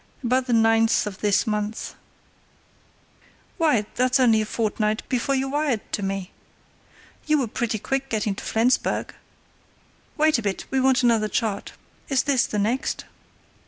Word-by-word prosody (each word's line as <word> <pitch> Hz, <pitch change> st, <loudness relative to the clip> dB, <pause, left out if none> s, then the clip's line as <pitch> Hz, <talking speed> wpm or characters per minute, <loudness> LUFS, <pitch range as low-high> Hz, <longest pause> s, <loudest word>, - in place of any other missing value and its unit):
"About 255 Hz, +2 st, +1 dB
the 245 Hz, -, +1 dB
ninth 225 Hz, 0 st, +3 dB
of 200 Hz, -2 st, -6 dB
this 205 Hz, 0 st, +2 dB
month." 210 Hz, 0 st, -3 dB, 1.7 s
"Why, 290 Hz, -10 st, +3 dB
that's 255 Hz, +2 st, +2 dB
only 225 Hz, -4 st, +4 dB
a 215 Hz, -, -3 dB
fortnight 215 Hz, -1 st, -1 dB
before 265 Hz, +2 st, 0 dB
you 265 Hz, 0 st, 0 dB
wired 285 Hz, -6 st, 0 dB
to -, -, -2 dB
me! 195 Hz, -1 st, -3 dB, 1.0 s
You 305 Hz, 0 st, +3 dB
were 265 Hz, -, +1 dB
pretty 225 Hz, 0 st, -2 dB
quick 270 Hz, +5 st, -3 dB
getting 215 Hz, -2 st, -1 dB
to -, -, -9 dB
Flensburg. 235 Hz, +3 st, 0 dB, 1.0 s
Wait 310 Hz, -3 st, +3 dB
a -, -, -3 dB
bit, 200 Hz, -3 st, -3 dB
we 265 Hz, -, +1 dB
want 260 Hz, 0 st, +3 dB
another 225 Hz, -3 st, +3 dB
chart. 210 Hz, -2 st, -2 dB, 0.4 s
Is 270 Hz, -3 st, +2 dB
this 270 Hz, -4 st, +2 dB
the 210 Hz, -, -3 dB
next?" 225 Hz, +6 st, -1 dB
230 Hz, 150 wpm, -24 LUFS, 215-260 Hz, 1.7 s, only